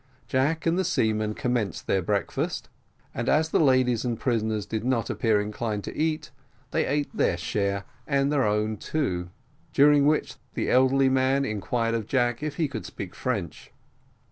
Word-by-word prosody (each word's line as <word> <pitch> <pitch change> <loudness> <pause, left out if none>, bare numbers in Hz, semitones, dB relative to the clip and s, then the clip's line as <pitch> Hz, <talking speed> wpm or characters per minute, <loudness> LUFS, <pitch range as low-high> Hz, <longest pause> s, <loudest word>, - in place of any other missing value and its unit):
Jack 135 +8 0
and 170 +2 +2
the - - +2
seamen 110 - 0
commenced 120 -5 -1
their 95 - +1
breakfast, 100 +3 -2 0.4
and 120 - -2
as 160 +1 +3
the - - +2
ladies 130 -5 +3
and 120 -3 -2
prisoners 110 -4 0
did 110 -1 -3
not 125 -2 0
appear 110 -3 +2
inclined 105 0 -3
to - - -6
eat, 155 -1 -1 0.4
they - - +1
ate 145 +1 -1
their - - +2
share 100 -1 -1 0.2
and 140 -1 +2
their 145 -3 +2
own 105 0 0
too; 90 - -2 0.4
during 145 0 +5
which 155 0 +1 0.2
the - - -1
elderly 130 +1 +4
man 130 +1 +2
inquired 115 +2 -1
of 115 -3 -2
Jack 120 -2 +1
if 150 -1 -3
he 160 -3 +1
could 125 -6 -6
speak 95 - -7
French. 100 -10 -4
125 Hz, 170 wpm, -26 LUFS, 105-140 Hz, 0.4 s, during